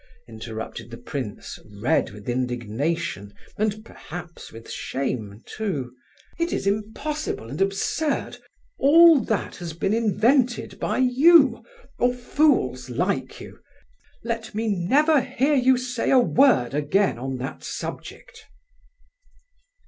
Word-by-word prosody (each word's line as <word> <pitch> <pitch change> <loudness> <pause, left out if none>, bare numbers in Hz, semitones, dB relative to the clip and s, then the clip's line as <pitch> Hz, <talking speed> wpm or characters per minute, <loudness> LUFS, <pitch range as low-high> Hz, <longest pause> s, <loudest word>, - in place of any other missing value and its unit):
interrupted 110 0 -7
the 115 - -9
prince, 125 -2 -6 0.2
red 140 +10 +1
with 105 0 -13
indignation, 125 0 -2 0.2
and 215 +1 -2
perhaps 175 -4 -10
with 115 0 -12
shame, 115 -6 -4
too. 150 - -4 0.5
"It 335 +1 0
is - - -2
impossible 215 - -3
and 145 - -5
absurd! 195 +10 -1 0.4
All 325 +2 +7
that 220 -1 -2
has 170 -3 -6
been 195 +5 -1
invented 235 +3 +1
by - - -1
you, 260 0 +5 0.4
or 245 +1 +2
fools 245 - +1
like 180 +11 -2
you! - - -11 0.6
Let 230 -2 -4
me 220 +1 -1
never 275 - +3
hear 275 +5 0
you 260 -2 +4
say 245 -1 -2
a 265 - +5
word 245 - +4
again 150 +2 +1
on 130 +1 -4
that 130 +2 -6
subject!" - - -8
200 Hz, 120 wpm, -24 LUFS, -, 0.6 s, All